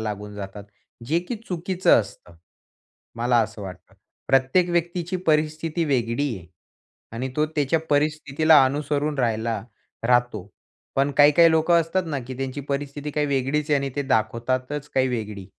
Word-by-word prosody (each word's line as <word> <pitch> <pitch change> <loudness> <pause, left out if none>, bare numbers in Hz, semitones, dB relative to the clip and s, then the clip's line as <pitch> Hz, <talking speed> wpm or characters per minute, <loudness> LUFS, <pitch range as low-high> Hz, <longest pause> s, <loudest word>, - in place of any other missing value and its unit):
लागून 105 -1 -5
जातात. 100 0 -8 0.4
जे 160 +6 +2
की 240 - -2
चुकीचं 180 -3 +2
असतं. 95 -4 -11 0.8
मला 120 +1 +2
असं 110 -1 -7
वाटतं. 95 -2 -10 0.3
प्रत्येक 135 +7 +3
व्यक्तीची 175 +1 -1
परिस्थिती 155 +1 +1
वेगळी 125 -2 0
आहे 85 -2 -12 0.7
आणि 125 +3 -3
तो 150 - +3
त्याच्या 155 0 0
परिस्थितीला 150 0 +4
अनुसरून 145 +2 -1
राहायला 115 -3 -1 0.4
राहतो, 120 -5 +1 0.5
पण 140 +1 +2
काही-काही 150 +3 +7
लोकं 160 +1 +4
असतात 165 +3 -1
ना, 150 -3 -2
की 130 +2 -8
त्यांची 135 +1 -4
परिस्थिती 145 +1 -3
काही 150 0 0
वेगळीचं 140 +2 0
आहे 145 - +4
आणि 135 0 -3
ते 145 - 0
दाखवतातचं 130 +3 -1 0.2
काही 130 0 +3
वेगळी. 105 -5 -4
140 Hz, 140 wpm, -24 LUFS, 115-155 Hz, 0.8 s, काही-काही